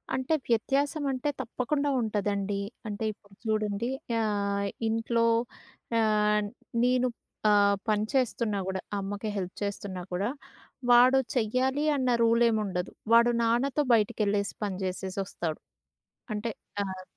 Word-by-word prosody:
అంటే 260 +4 0
వ్యత్యాసం 275 +6 +1
అంటే 260 +2 -1
తప్పకుండా 280 +4 -1
ఉంట‌దండి. 205 -2 -1 0.3
అంటే 210 +1 -4
ఇప్పుడు 200 -1 -25
చూడండి. 215 0 0 0.3
యా 230 - +1 0.7
ఇంట్లో 230 +1 +1 0.7
యాన్ 210 -1 +3 0.4
నేను 250 0 +3 0.4
ఆహ్, 200 -1 +5
పనిచేస్తున్నా 215 0 +1
కూడా, 190 0 -2 0.2
అమ్మకి 200 +2 -4
హెల్ప్ 185 -2 -3
చేస్తున్నా 200 -2 -4
కూడా, 195 +5 0 0.6
వాడు 250 +2 +7 0.2
చెయ్యాలి 255 +5 +1
అన్న 260 -2 +1
రూల్ 230 +1 +4
ఏం 220 - +1
ఉండదు. 180 -2 -3 0.2
వాడు 235 +1 +7
నాన్నతో 255 +6 +2
బయటికె‌ళ్ళేసి 205 -2 +1
పని 195 -2 -3
చేసేసి 185 +1 -4
వస్తాడు. 165 -4 -4 0.8
అంటే 210 +2 -2 0.3
ఆహ్, 190 -1 -5
215 Hz, 115 wpm, -28 LUFS, 200-245 Hz, 0.8 s, వాడు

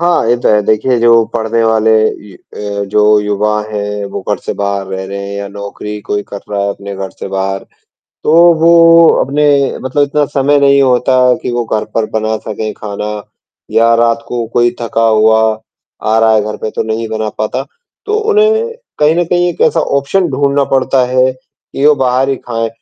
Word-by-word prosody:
हाँ, 170 -8 +1
ये 120 - +3
तो - - +1
है। 105 -1 +4
देखिए, 110 +4 +1
जो 115 -1 +4
पढ़ने 115 0 0
वाले 110 0 +2 0.4
ये 95 - -14
अ, 100 +2 -6
जो 105 +1 +3
युवा 105 +1 -1
हैं, 105 -1 -4
वो 100 - -6
घर - - +1
से - - -2
बाहर 100 -1 -3
रह 95 0 -5
रहे 100 +1 -6
हैं 100 - -6
या 100 0 -5
नौकरी 100 +1 -7
कोई 105 0 -3
कर 100 - -7
रहा 100 -1 -2
है 100 - -1
अपने 100 0 -7
घर 95 0 -6
से - - -6
बाहर, 95 0 -3 0.6
तो - - +2 0.3
वो 165 0 +6 0.2
अपने 145 +3 -1 0.4
मतलब 130 +3 0
इतना 145 +1 +1
समय 145 0 +1
नहीं 140 0 +4
होता 130 0 +2 0.2
कि - - -3
वो 120 0 -1
घर 110 -1 -2
पर 115 -1 0
बना 110 0 -1
सकें 110 0 -4
खाना 105 0 -5 0.6
या 115 +1 +3
रात 115 0 +1
को 120 -1 -3
कोई 120 0 +2
थका 115 -1 -1
हुआ 110 0 +3 0.6
आ 110 +1 +1
रहा 115 0 +4
है 110 - +2
घर 105 0 -5
पे, 110 - -5
तो - - -3
नहीं 110 +1 -3
बना 110 0 -3
पाता, 110 - -2 0.4
तो 425 - -1
उन्हें 440 +1 +1 0.3
कहीं 150 +1 +3
न 175 - +2
कहीं 175 +1 +1
एक 175 - -6
ऐसा 165 - +2
ऑप्शन 145 +7 0
ढूँढ़ना 140 +1 +1
पड़ता 130 0 +2
है 130 +1 +2
कि 130 +2 -5
वो 150 - +6
बाहर 130 0 0
ही 135 - 0
खाएँ 115 -2 -3
115 Hz, 200 wpm, -13 LUFS, 105-140 Hz, 0.6 s, वो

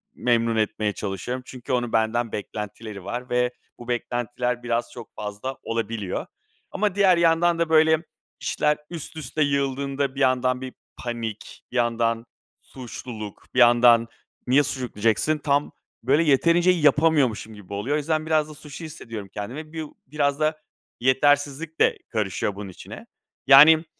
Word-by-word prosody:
memnun 115 -1 +1
etmeye 110 -1 0
çalışıyorum. 105 +7 -4
Çünkü 130 0 -6
onun 120 -2 -1
benden 115 +1 +1
beklentileri 105 -1 -6
var 125 +6 -5
ve 125 0 +1 0.3
bu 120 - -10
beklentiler 120 0 -2
biraz 120 0 -1
çok 120 -3 -11
fazla 105 +6 -5
olabiliyor. 115 -4 -3 0.5
Ama 205 -1 0
diğer 190 -3 +5
yandan 170 0 +3
da, 170 -1 +1
böyle, 160 0 +5 0.4
işler 150 0 +1
üst 160 -2 -8
üste 155 0 -4
yığıldığında 140 -1 -1
bir - - -6
yandan 130 -1 +2
bir 130 -1 -6 0.3
panik, 115 -3 -6
bir - - -10
yandan 115 -1 +1 0.4
suçluluk, 115 -4 -9
bir 125 - +1
yandan 120 -1 +6 0.4
"Niye 135 +4 +5
suçluluk?" 130 -4 -4
diyeceksin, 115 +8 +2
tam 145 -1 0 0.3
böyle 140 +7 +3
yeterince 170 +4 +4
yapamıyormuşum 145 - +2
gibi 100 -2 -11
oluyor. 110 +9 -1
O - - +2
yüzden 155 +1 -1
biraz 155 -1 +1
da - - -9
suçlu 150 +2 -10
hissediyorum 115 -10 -8
kendimi. 135 +10 -6
Bir 160 -1 -4 0.2
biraz 140 0 0
da 155 0 +1 0.4
yetersizlik 145 +4 +1
de - - +4
karışıyor 105 -2 -2
bunun 100 -1 -7
içine. 90 - -11 0.4
Yani, 155 +4 +8
130 Hz, 145 wpm, -24 LUFS, 115-150 Hz, 0.5 s, Yani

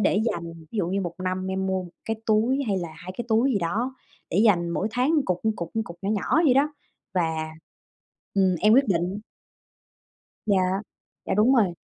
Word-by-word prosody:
để 205 0 +3
dành, 170 -1 -6 0.2
ví 225 - -3
dụ 180 - +1
như 195 +2 0
1 175 -3 -4
năm 185 0 -1
em 190 0 -1
mua 190 -1 0
1 175 - -10
cái 225 - -2
túi, 230 +6 +3
hay 200 -3 +1
là 175 -2 -4
2 185 - -8
cái 240 - -2
túi 230 +4 +3
gì 210 - +2
đó. 215 +9 -1 0.4
Để 175 - +1
dành 175 -6 +4
mỗi 190 - -1
tháng 250 +7 +1
cục, 180 -1 -1 0.2
cục, 170 -1 -5
cục 170 - -10
nhỏ 195 - -1
nhỏ 215 - +2
vậy 265 -5 +5
đó, 290 +3 +3 0.4
và 160 -3 0 0.8
ừm, 190 -2 +3
em 215 +1 +6
quyết 270 0 +5
định 180 +1 0 1.3
Dạ. 190 -2 +2 0.4
Dạ, - - 0
đúng 225 +7 +4
rồi. 200 -8 +3
195 Hz, 195 wpm, -25 LUFS, 180-225 Hz, 1.3 s, em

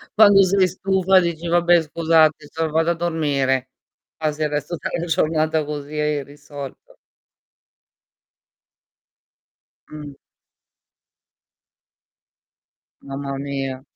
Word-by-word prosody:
Quando 205 -2 +7
sei 190 0 +3
stufa 190 +1 +2
dici: 170 -1 -3
"Vabbè, 175 0 +4
scusate 160 -1 +2
so 160 0 -2
vado 160 +2 +1
a - - +2
dormire". 145 -6 -1 0.5
Passi 155 -1 -3
il 150 - +1
resto 150 +3 -3
della 170 - -3
giornata 155 -1 0
così 150 0 -6
e - - 0
hai 150 -1 -1
risolto. 145 -1 -11 2.9
Mh. 150 -2 -9 2.9
Mamma 140 0 -6
mia. 135 -1 -4
155 Hz, 95 wpm, -21 LUFS, 145-170 Hz, 2.9 s, Quando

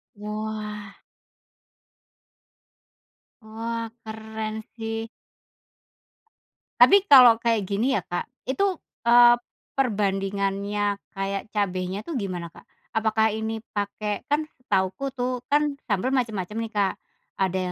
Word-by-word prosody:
Wah. 210 -1 -5 2.5
Wah 230 +1 -4 0.2
keren 220 0 -5 0.2
sih! 225 -1 -4 1.8
Tapi 400 -1 +8
kalau 250 -4 +10
kayak 225 -5 +1
gini 215 +7 +1
ya, 205 - +2
Kak, 175 0 -2 0.2
itu, 275 +10 0 0.4
eee, 240 0 +8 0.4
perbandingannya 200 -3 0 0.2
kayak 195 +1 -4
cabenya 190 -2 -1
tuh 330 - -4
gimana, 185 -6 -3
Kak? 165 - -16 0.3
Apakah 220 0 +2
ini 220 0 -3 0.2
pakai 205 +1 -2
kan 305 +1 +1
setahuku 250 +2 -1
tuh 250 -1 -3
kan 295 -1 +3 0.2
sambil 255 +8 +1
macem-macem 215 -5 -2
nih, 225 -1 -3
Kak, 200 -2 +1 0.4
ada 190 -1 0
215 Hz, 100 wpm, -25 LUFS, 200-235 Hz, 2.5 s, kalau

